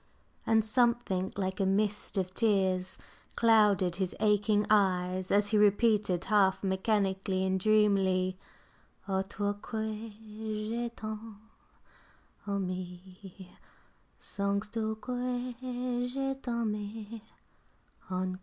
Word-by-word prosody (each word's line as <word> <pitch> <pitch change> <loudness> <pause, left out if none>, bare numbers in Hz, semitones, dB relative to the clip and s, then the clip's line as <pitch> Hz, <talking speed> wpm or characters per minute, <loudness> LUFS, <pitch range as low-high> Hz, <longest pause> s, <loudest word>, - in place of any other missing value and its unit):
And 220 -1 +4
something 235 -5 +1
like 190 -1 -2
a 195 - +2
mist 205 +1 0
of 185 -1 -1
tears 190 -4 +1 0.4
clouded 210 -6 +4
his 190 -1 -2
aching 210 0 +2
eyes 185 -3 +2
as 205 0 +3
he 215 -1 +3
repeated, 205 -3 +3
half 200 -2 +3
mechanically 190 -1 0
and 190 0 +1
dreamily 195 -3 +3 0.7
O 190 -1 +1
toi 205 +1 -2
que 220 0 -4
j'ai 220 +2 -5
tant 215 0 -7 1.1
aimée, 185 0 -6 0.7
Songes 200 +1 -2
tu 220 -1 -1
que 250 0 -3 0.5
je 270 +1 -2
t'aime 220 -2 -4 0.9
encor? 185 0 -2
205 Hz, 100 wpm, -30 LUFS, 190-220 Hz, 1.1 s, And